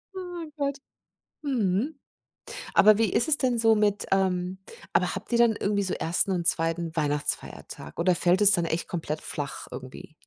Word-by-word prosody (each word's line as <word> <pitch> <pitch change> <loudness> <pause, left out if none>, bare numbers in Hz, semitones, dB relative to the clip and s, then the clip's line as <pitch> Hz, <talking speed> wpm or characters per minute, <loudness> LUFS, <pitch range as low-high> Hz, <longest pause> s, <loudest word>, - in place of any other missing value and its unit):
Oh 355 -3 -6
Gott. 280 -1 -2 0.7
Mhm. 245 - -1 0.8
Aber 215 0 +6
wie 225 -4 +1
ist - - +1
es 315 -1 +5
denn 250 -3 0
so 225 -1 +4
mit 210 -1 +1
ähm, 185 -1 0 0.3
aber - - +1
habt - - -8
ihr 235 - +2
dann 235 -2 +4
irgendwie 200 0 -1
so 185 - -2
1. 175 +4 +1
und 175 -2 0
2. 165 0 0
Weihnachtsfeiertag 145 - -3
oder 180 +1 +3
fällt 180 +3 +3
es 205 0 +8
dann 175 -4 +3
echt 165 +1 -2
komplett 160 -3 -4
flach 145 -2 -5
irgendwie? 130 +3 -10
190 Hz, 170 wpm, -26 LUFS, 170-230 Hz, 0.8 s, es